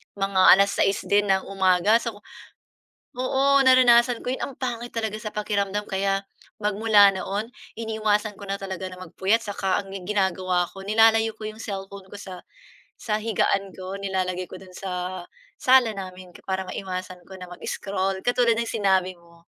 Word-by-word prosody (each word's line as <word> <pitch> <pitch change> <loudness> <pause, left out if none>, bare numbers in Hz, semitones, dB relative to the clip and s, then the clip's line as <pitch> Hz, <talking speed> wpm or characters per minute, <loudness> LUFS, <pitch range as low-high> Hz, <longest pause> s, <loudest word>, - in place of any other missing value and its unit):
mga 195 -1 +1
6:00 195 0 +1
din 205 0 +2
ng 190 -1 +2
umaga, 195 +3 +3
so 235 -2 -5 0.9
ku 255 +1 -4
oo, 275 +1 +3
naranasan 245 -2 +5
ko - - -4
'yon, 260 - -1
ang 275 - -9
pangit 240 -2 -5
talaga 220 -2 -2
sa 215 -1 -7
pakiramdam 205 -1 -1
kaya 195 0 0 0.4
magmula 210 -1 +5
noon 200 +3 -3 0.2
iniiwasan 215 -2 -1
ko 200 - -9
na 195 - -3
talaga 190 -1 -5
na 185 0 -8
magpuyat, 190 +5 0
saka 200 -3 -1
ang 195 - -14 0.2
ginagawa 185 -3 0
ko, 195 0 -11
nilalayo 225 +1 +4
ko 215 0 -7
'yong 215 - -11
cellphone 195 -2 -7
ko 190 - -16
sa 185 -3 -10 0.5
sa 215 -1 -2
higaan 200 -2 0
ko, 185 0 -6
nilalagay 185 -2 -2
ko - - -8
do'n 185 -1 -15
sa, 180 -1 -5 0.4
sala 255 -3 +5
namin 185 -2 -9 0.2
para 190 0 -1
maiwasan 185 -1 -6
ko 190 - -9
na 185 - -8
mag-scroll, 190 +2 -4
katulad 245 -2 +3
ng 235 - 0
sinabi 190 -5 +1
mo. 170 -1 -22
200 Hz, 160 wpm, -24 LUFS, 190-220 Hz, 0.9 s, naranasan